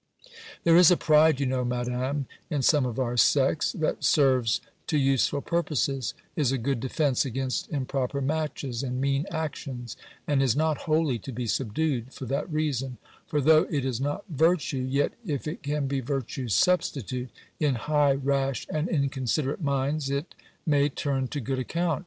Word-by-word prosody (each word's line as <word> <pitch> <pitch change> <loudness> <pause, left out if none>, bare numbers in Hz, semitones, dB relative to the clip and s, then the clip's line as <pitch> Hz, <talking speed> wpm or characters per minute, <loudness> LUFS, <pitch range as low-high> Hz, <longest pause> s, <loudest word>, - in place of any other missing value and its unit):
There 165 0 +6
is 175 -2 +8
a 180 - +5
pride, 155 -2 +4
you 140 - +1
know, 130 -1 0
Madam, 125 +3 -2 0.2
in 145 -5 -1
some 145 -1 +4
of 120 -1 -5
our 125 -2 -1
sex, 140 +4 +3
that 160 - -2
serves 130 -7 +3 0.3
to 155 - +1
useful 135 0 +2
purposes, 140 -7 -1 0.2
is 140 -5 +1
a 135 - +1
good 130 +1 -1
defence 135 +1 +1
against 130 0 -3
improper 135 -1 -2
matches, 140 -4 -2
and 125 -2 -3
mean 140 +2 0
actions; 140 - -5 0.3
and 145 -2 +2
is 130 -3 +2
not 155 0 +1
wholly 155 -6 +2
to 135 - -8
be 125 0 -4
subdued, 130 +2 -1
for 130 - -6
that 140 +7 -2
reason; 135 -5 -1 0.3
for, 150 - 0
though 155 +2 +5
it 140 -4 -1
is 130 -2 -2
not 145 +8 -2
virtue, 150 -5 +1
yet, 140 +2 +1
if 150 - -3
it 155 - -5
can 145 0 -1
be 135 0 -1
virtue's 130 -4 -2
substitute, 130 - +1 0.3
in 145 -4 +2
high, 145 +3 +2
rash, 135 -1 -1
and 155 +2 -1
inconsiderate 140 0 -1
minds, 140 0 0
it; 140 +4 -3 0.3
may 145 -2 +3
turn 135 -2 -1
to 145 - -4
good 130 +1 -2
account. 165 +4 -1
140 Hz, 170 wpm, -27 LUFS, 130-150 Hz, 0.3 s, is